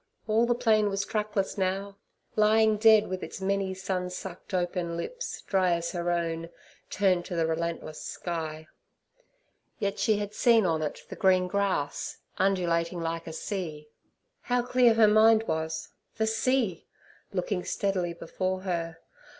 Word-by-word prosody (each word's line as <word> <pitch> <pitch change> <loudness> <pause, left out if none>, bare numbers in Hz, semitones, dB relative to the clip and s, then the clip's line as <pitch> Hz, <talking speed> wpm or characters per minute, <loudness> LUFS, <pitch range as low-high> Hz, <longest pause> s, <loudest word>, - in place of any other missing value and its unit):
all 225 +2 +3
the 240 - +2
plain 220 -4 +3
was 195 0 -1
trackless 210 -2 -2
now, 195 +1 -1 0.4
lying 215 0 +4
dead, 215 0 +6
with 185 0 -4
its - - -7
many 195 0 0
sun 185 -1 -3
sucked 180 0 -8
open 175 -2 -1
lips, - - -5
dry 185 -3 +2
as 170 0 -2
her 175 -1 -2
own, 165 -1 -1 0.4
turned 185 -3 +2
to 180 - -6
the 165 -1 +2
relentless 165 -1 -3
sky. 160 -2 -5 1.1
Yet 200 -1 -2
she 215 -2 +3
had 205 0 -4
seen 230 -1 +4
on 160 -3 +1
it 150 - -4
the - - -6
green 185 -2 +3
grass, 190 -7 -1 0.2
undulating 175 -2 +1
like 165 0 -3
a 160 - -6
sea. 160 -5 -5 0.5
How 245 0 0
clear 245 -2 +4
her 220 -1 +6
mind 220 +1 +6
was—the 160 +5 -4
sea! 225 -4 0 0.4
looking 180 0 -2
steadily 185 -4 -1
before 185 +2 -3
her. 170 -3 -3
190 Hz, 145 wpm, -28 LUFS, 170-215 Hz, 1.1 s, dead